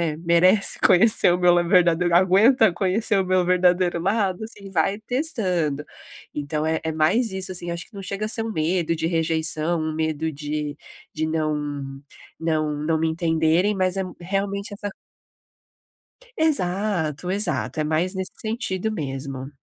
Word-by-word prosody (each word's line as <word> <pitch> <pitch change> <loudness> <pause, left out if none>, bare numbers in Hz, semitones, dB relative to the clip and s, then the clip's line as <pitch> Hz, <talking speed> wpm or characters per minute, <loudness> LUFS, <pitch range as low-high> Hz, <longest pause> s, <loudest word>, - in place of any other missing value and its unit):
né, - - -13
merece 175 +4 +3
conhecer 205 0 +5
o - - 0
meu 180 -1 +5 0.2
verdadeiro 175 -2 +3
aguenta 195 +4 +4
conhecer 200 +3 0
o 190 - 0
meu 185 -1 +1
verdadeiro 180 -1 +2
lado, 195 0 -1
assim, 205 -3 -10
vai 195 +4 0
testando. 185 - -1 0.5
Então 150 +1 -3
é 160 0 -1
é 160 - -2
mais 175 +10 +1
isso, 190 -1 -2
assim, 175 -1 -2
acho 170 -2 -6
que - - -26
não 200 - -8
chega 200 +2 -4
a - - -2
ser 225 0 +2
um 225 - -4
medo 165 -1 0
de 160 - -2
rejeição, 165 0 +1
um 155 0 -3
medo 160 0 -2
de 150 0 -4 0.4
de 155 0 -2
não 145 -3 -3 0.4
não 155 -2 -1
não 160 0 0
me 160 - +1
entenderem, 165 +4 +1
mas 185 -1 0
é 190 - 0 0.2
realmente 200 +3 -3
essa 205 0 -5 1.5
Exato, 185 - 0
exato, 155 - 0
é - - +1
mais 160 +5 0
nesse 190 -1 -4
sentido 220 -2 -3
mesmo. 135 -5 -5
175 Hz, 155 wpm, -23 LUFS, 155-195 Hz, 1.5 s, conhecer